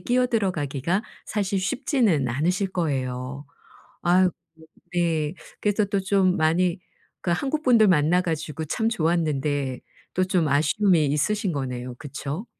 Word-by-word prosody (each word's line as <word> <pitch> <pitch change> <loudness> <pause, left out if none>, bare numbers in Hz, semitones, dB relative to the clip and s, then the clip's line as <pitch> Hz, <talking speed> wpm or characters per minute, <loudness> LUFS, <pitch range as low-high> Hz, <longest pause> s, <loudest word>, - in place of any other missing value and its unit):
끼어들어 245 -5 +1
가기가 150 +5 -1 0.2
사실 200 -2 -1
쉽지는 205 - +1
않으실 180 +10 0
거예요. 135 -5 -3 0.6
아이고 180 +1 +4 0.6
네. 165 -3 0 0.3
그래서 210 0 +2
또 200 0 0
좀 190 -1 +2
많이 170 +3 +2 0.4
그러니까 175 -1 0
한국분들 255 -7 +3
만나 175 0 +4
가지고 160 -2 -3
참 220 +9 0
좋았는데 150 - 0 0.3
또 185 - +2
좀 180 -3 +1
아쉬움이 155 +3 +3
있으신 185 +7 0
거네요. 125 -3 -4
그쵸? 145 - -5
175 Hz, 290 characters per minute, -24 LUFS, 145-195 Hz, 0.6 s, 아이고